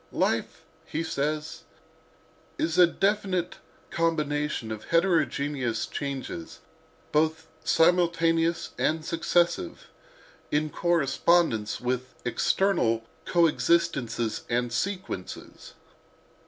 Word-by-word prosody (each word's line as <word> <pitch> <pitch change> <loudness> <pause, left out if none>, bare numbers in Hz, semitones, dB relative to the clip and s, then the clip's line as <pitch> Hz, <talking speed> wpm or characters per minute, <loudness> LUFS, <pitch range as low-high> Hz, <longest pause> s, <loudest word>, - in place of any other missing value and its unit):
"'Life,' - - -1 0.2
he 160 - -2
says, 150 0 -2 1.0
'is 165 +2 0
a 180 - +9
definite 190 -2 0 0.3
combination 150 -7 -1
of 110 -1 -6
heterogeneous 145 -8 +1
changes, 135 - -5 0.5
both 160 +1 +1 0.2
simultaneous 165 -1 +2
and 155 0 0
successive, 175 - 0 0.6
in 150 0 0
correspondence 165 -7 +2
with 130 +1 -3
external 125 - +1 0.2
coexistences 150 -9 +1
and 120 0 0
sequences. 185 - -5
160 Hz, 75 wpm, -27 LUFS, 130-170 Hz, 1.0 s, a